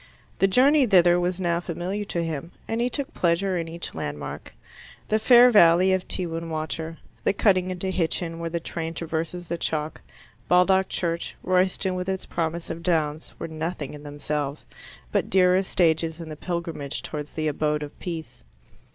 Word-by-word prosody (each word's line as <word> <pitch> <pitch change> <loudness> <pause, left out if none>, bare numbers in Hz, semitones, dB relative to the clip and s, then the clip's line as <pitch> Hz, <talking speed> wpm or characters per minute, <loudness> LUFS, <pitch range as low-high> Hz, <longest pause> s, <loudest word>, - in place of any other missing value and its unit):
The 195 - +5
journey 265 +7 +5
thither 175 -3 +5
was 180 +1 -1
now 170 -2 +1
familiar 175 +4 -4
to 170 -4 -2
him, 165 0 -4
and 225 +1 -1
he 245 - +1
took 275 +2 -4
pleasure 180 +2 +1
in 165 -2 -2
each 170 +1 -6
landmark. 75 -2 -5 0.6
The 215 - +3
fair 245 +2 +7
valley 185 -2 +6
of 185 -1 -1
Tewin 165 -2 -3
Water, 160 +1 -3 0.3
the - - +2
cutting 185 -3 +3
into 185 +1 -2
Hitchin 165 -1 -1
where 170 0 -3
the 170 +1 -2
train 165 0 -5
traverses 165 +2 -3
the 170 0 -3
chalk, 155 -1 -2 0.5
Baldock 190 +2 +4
Church, 170 -1 -2
Royston 185 +1 +1
with 180 +1 -3
its 190 -1 -2
promise 165 0 -3
of 165 - -6
downs, 160 -3 -1
were 165 - -5
nothing 160 -2 -4
in 145 - -9
themselves, 145 0 -4 0.5
but - - 0
dear 180 -1 +5
as 190 0 +1
stages 160 -1 +2
in 165 -1 -7
the 155 - -6
pilgrimage 165 -4 -4
towards 150 -1 -6
the 155 -1 -1
abode 150 0 0
of 145 - -10
peace. 165 -3 -6
170 Hz, 175 wpm, -25 LUFS, 160-185 Hz, 0.6 s, fair